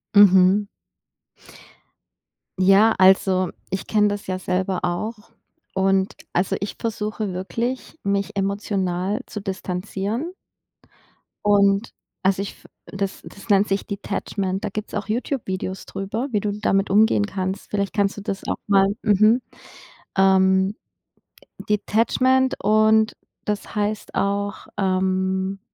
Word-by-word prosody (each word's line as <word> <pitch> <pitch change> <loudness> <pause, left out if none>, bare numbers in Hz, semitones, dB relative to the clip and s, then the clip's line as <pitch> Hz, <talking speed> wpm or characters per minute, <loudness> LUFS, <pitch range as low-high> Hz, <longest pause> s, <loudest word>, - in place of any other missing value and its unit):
Mhm. 195 0 +6 1.9
Ja. 195 +4 +6
Also, 185 -1 +4 0.2
ich 190 0 -4
kenne 210 -1 +3
das 205 -1 -5
ja 185 0 -1
selber 185 0 -1
auch. 210 +5 -3 0.4
Und 190 0 +1 0.2
also, 180 +2 +1
ich 200 - -4
versuche 215 -3 -3
wirklich, 235 - -4
mich 200 +1 -1
emotional 195 -1 -1
zu 210 - -6
distanzieren. 200 - -3 1.1
Und 200 +1 +3 0.3
also 190 0 +2
ich 200 - -4
f - - -21 0.2
das 195 0 -4
das 205 +3 -13
nennt 200 +1 +4
sich 195 0 -1
Detachment. 195 -1 -3
Da 210 - -1
gibt's 215 +2 -6
auch - - -3
YouTube-Videos 215 -5 -3
drüber, 215 +7 -4
wie 210 - +1
du 205 0 -1
damit 195 -1 +1
umgehen 195 - +4
kannst. 190 - -4
Vielleicht 200 -1 -1
kannst 200 -2 +1
du 205 - -6
das 195 -1 -4
auch - - -1
mal 195 -1 +5 0.2
mhm. 215 +3 +4 0.8
Ähm, 190 +1 +4 0.9
Detachment 255 +5 +2
und 215 +1 +4 0.3
das 210 +1 -3
heißt 210 0 -2
auch, 200 +1 -1
ähm 190 0 0
200 Hz, 120 wpm, -22 LUFS, 190-210 Hz, 1.9 s, Mhm